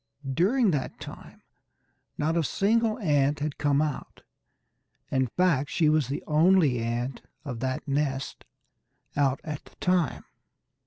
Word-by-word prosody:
During 210 Hz, -, +3 dB
that 140 Hz, -5 st, -3 dB
time -, -, -11 dB, 0.7 s
not 160 Hz, +3 st, 0 dB
a 170 Hz, -, +2 dB
single 220 Hz, +6 st, +1 dB
ant 145 Hz, -, +2 dB
had 150 Hz, 0 st, -3 dB
come 145 Hz, 0 st, +2 dB
out; 150 Hz, -3 st, -5 dB, 0.9 s
in 130 Hz, -1 st, +2 dB
fact 145 Hz, -1 st, +1 dB
she 155 Hz, -3 st, +2 dB
was 155 Hz, -4 st, +2 dB
the 140 Hz, -, -4 dB
only 155 Hz, -4 st, +4 dB
ant 120 Hz, +3 st, -3 dB, 0.2 s
of 125 Hz, -5 st, -5 dB
that 130 Hz, +4 st, -3 dB
nest 140 Hz, -1 st, -2 dB, 0.7 s
out 140 Hz, -1 st, +2 dB
at 150 Hz, -2 st, -6 dB
the -, -, -19 dB
time. 180 Hz, -6 st, 0 dB
150 Hz, 135 wpm, -27 LUFS, 135-170 Hz, 0.9 s, only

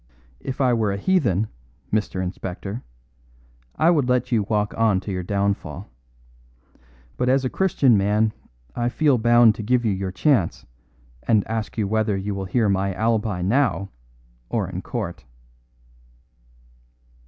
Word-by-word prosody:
If 130 Hz, -, -6 dB
I 130 Hz, -3 st, +3 dB
were 110 Hz, -3 st, +1 dB
a 100 Hz, -, -2 dB
heathen, 110 Hz, -, +1 dB, 0.5 s
Mr. 105 Hz, -3 st, 0 dB
Inspector, 95 Hz, +4 st, -5 dB, 0.9 s
I 165 Hz, +2 st, +4 dB
would 145 Hz, -7 st, +1 dB
let 125 Hz, 0 st, +1 dB
you 115 Hz, -3 st, +3 dB
walk 105 Hz, 0 st, -1 dB
on 110 Hz, -4 st, +2 dB
to 100 Hz, -, -6 dB
your 90 Hz, -1 st, -2 dB
downfall. 100 Hz, -3 st, -2 dB, 1.3 s
But 125 Hz, 0 st, +1 dB
as 135 Hz, 0 st, +2 dB
a 130 Hz, -, -1 dB
Christian 140 Hz, -, +3 dB
man 105 Hz, +2 st, +1 dB, 0.4 s
I 120 Hz, 0 st, 0 dB
feel 140 Hz, -1 st, +2 dB
bound 120 Hz, -1 st, +6 dB
to 110 Hz, -, -7 dB
give 120 Hz, +3 st, +1 dB
you 110 Hz, -, +2 dB
your 95 Hz, -1 st, -3 dB
chance, 110 Hz, -, +1 dB, 0.6 s
and 110 Hz, -3 st, +2 dB
ask 110 Hz, 0 st, -4 dB
you 105 Hz, -3 st, 0 dB
whether 110 Hz, -1 st, 0 dB
you 100 Hz, +1 st, -3 dB
will 95 Hz, 0 st, -4 dB
hear 110 Hz, +3 st, +1 dB
my 95 Hz, -1 st, 0 dB
alibi 110 Hz, -5 st, 0 dB
now 100 Hz, -2 st, +1 dB, 0.6 s
or 110 Hz, -5 st, -1 dB
in 90 Hz, 0 st, -5 dB
court." 95 Hz, -10 st, -5 dB
110 Hz, 145 wpm, -23 LUFS, 95-120 Hz, 1.3 s, bound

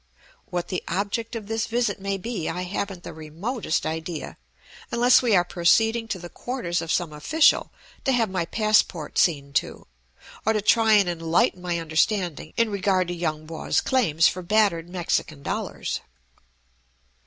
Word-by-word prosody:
What 175 Hz, -3 st, -3 dB
the 185 Hz, -, -3 dB
object 205 Hz, +6 st, -2 dB
of 220 Hz, -3 st, -5 dB
this 225 Hz, +1 st, -2 dB
visit 235 Hz, -3 st, -1 dB
may 195 Hz, 0 st, -1 dB
be 195 Hz, -3 st, -4 dB
I 180 Hz, +2 st, -3 dB
haven't 185 Hz, -1 st, -4 dB
the -, -, -8 dB
remotest 165 Hz, -, -3 dB
idea, 160 Hz, +1 st, -4 dB, 0.6 s
unless 245 Hz, +2 st, +5 dB
we 235 Hz, -5 st, +3 dB
are 175 Hz, -, +5 dB
proceeding 225 Hz, +7 st, +2 dB
to 200 Hz, -, -3 dB
the 175 Hz, -1 st, -8 dB
quarters 180 Hz, -4 st, -3 dB
of 165 Hz, -, -4 dB
some 175 Hz, -4 st, 0 dB
official 295 Hz, -, +3 dB, 0.3 s
to 270 Hz, -, +3 dB
have 235 Hz, -3 st, +2 dB
my 185 Hz, -3 st, -2 dB
passport 210 Hz, -6 st, +1 dB
seen 140 Hz, -5 st, +1 dB
to, -, -, -1 dB, 0.6 s
or 220 Hz, -, +2 dB
to 215 Hz, -, 0 dB
try 220 Hz, 0 st, +4 dB
and 205 Hz, -3 st, +5 dB
enlighten 170 Hz, +1 st, +1 dB
my 175 Hz, -1 st, -1 dB
understanding 165 Hz, 0 st, 0 dB
in 230 Hz, -2 st, +2 dB
regard 185 Hz, -2 st, +1 dB
to -, -, -2 dB
Yung 155 Hz, -3 st, -3 dB
Po's 160 Hz, 0 st, -1 dB
claims 170 Hz, -, +3 dB
for 185 Hz, -, -2 dB
battered 175 Hz, -3 st, +2 dB
Mexican 170 Hz, -4 st, -2 dB
dollars. -, -, -3 dB
185 Hz, 160 wpm, -24 LUFS, 165-220 Hz, 0.6 s, unless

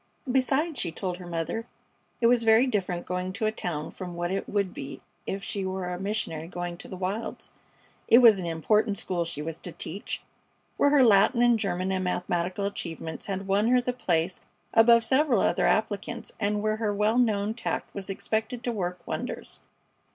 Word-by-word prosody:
Besides, 270 Hz, +4 st, +1 dB
she 170 Hz, -, -1 dB
told 180 Hz, +1 st, -4 dB
her 180 Hz, -1 st, -10 dB
mother 175 Hz, +7 st, -3 dB, 0.5 s
it -, -, +3 dB
was 240 Hz, 0 st, +5 dB
very 225 Hz, +2 st, +5 dB
different 185 Hz, -8 st, -1 dB
going 180 Hz, 0 st, -2 dB
to 220 Hz, +2 st, -2 dB
a 215 Hz, -, +2 dB
town 160 Hz, -8 st, -4 dB
from 180 Hz, -2 st, -7 dB
what 175 Hz, +1 st, -2 dB
it 195 Hz, -, -2 dB
would 200 Hz, -3 st, 0 dB
be 135 Hz, -, -7 dB, 0.3 s
if 195 Hz, +1 st, -3 dB
she 195 Hz, +2 st, -3 dB
were 190 Hz, -1 st, -3 dB
a 180 Hz, -, -5 dB
missionary 195 Hz, -6 st, -2 dB
going 175 Hz, -1 st, -4 dB
to -, -, -7 dB
the 185 Hz, -, -7 dB
wilds. 190 Hz, +5 st, -4 dB, 0.6 s
It 235 Hz, -, +8 dB
was 230 Hz, -5 st, +7 dB
an 175 Hz, -, -3 dB
important 205 Hz, +6 st, +1 dB
school 175 Hz, -2 st, -1 dB
she 150 Hz, -3 st, -4 dB
was 165 Hz, 0 st, -5 dB
to 175 Hz, -, -5 dB
teach, 190 Hz, +4 st, -5 dB, 0.5 s
where 285 Hz, -, +4 dB
her 285 Hz, -2 st, +5 dB
Latin 230 Hz, +3 st, +5 dB
and 240 Hz, -2 st, +4 dB
German 185 Hz, -2 st, -1 dB
and 185 Hz, -1 st, 0 dB
mathematical 180 Hz, +1 st, -1 dB
achievements 165 Hz, -5 st, -5 dB
had 195 Hz, -1 st, -3 dB
won 200 Hz, +3 st, +2 dB
her 250 Hz, +1 st, +5 dB
the 245 Hz, 0 st, -2 dB
place 175 Hz, -6 st, 0 dB, 0.3 s
above 230 Hz, +1 st, +6 dB
several 260 Hz, -1 st, +3 dB
other -, -, +2 dB
applicants, 220 Hz, +2 st, -1 dB
and 205 Hz, 0 st, 0 dB
where 215 Hz, 0 st, +1 dB
her 220 Hz, -2 st, 0 dB
well 210 Hz, +4 st, +2 dB
known 215 Hz, -3 st, +2 dB
tact 235 Hz, -, -4 dB
was 200 Hz, -1 st, -5 dB
expected 220 Hz, +4 st, -2 dB
to 245 Hz, -, -1 dB
work 180 Hz, -5 st, -4 dB
wonders. -, -, -5 dB
200 Hz, 190 wpm, -27 LUFS, 180-225 Hz, 0.6 s, It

